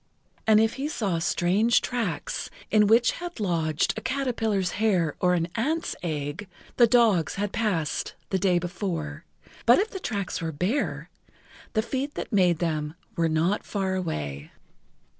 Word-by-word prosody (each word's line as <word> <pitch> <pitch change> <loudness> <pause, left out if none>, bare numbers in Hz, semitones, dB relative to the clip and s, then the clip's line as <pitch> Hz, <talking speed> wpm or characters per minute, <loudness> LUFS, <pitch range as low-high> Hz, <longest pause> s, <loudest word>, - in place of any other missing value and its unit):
And 215 -1 +6
if 225 +1 +3
he 290 - 0
saw 200 - -1
strange 190 +7 +3
tracks, 225 -11 -3 0.2
in 210 -1 +5
which 230 +3 +5
had 350 -5 -7
lodged 165 -6 +1
a 220 - -5
caterpillar's 225 -8 0
hair 180 -9 +2
or 180 -1 +3
an 165 -1 0
ant's 310 +8 -1
egg, 155 +3 -4 0.3
the 240 - +7
dogs 220 - +3
had 205 0 -2
passed 175 -11 -1 0.2
the 190 - +1
day 185 -1 +3
before, 170 -4 -4 0.4
but 240 - +8
if 430 +3 0
the 385 - -5
tracks 200 - -3
were 165 -1 -2
bare, 185 - -2 0.6
the 220 - +2
feet 270 +4 -3
that - - -5
made 180 -4 +4
them 155 -2 -2 0.2
were 165 -1 +1
not 165 +6 +1
far 195 -2 -2
away. 75 - -3
195 Hz, 155 wpm, -26 LUFS, 165-225 Hz, 0.6 s, but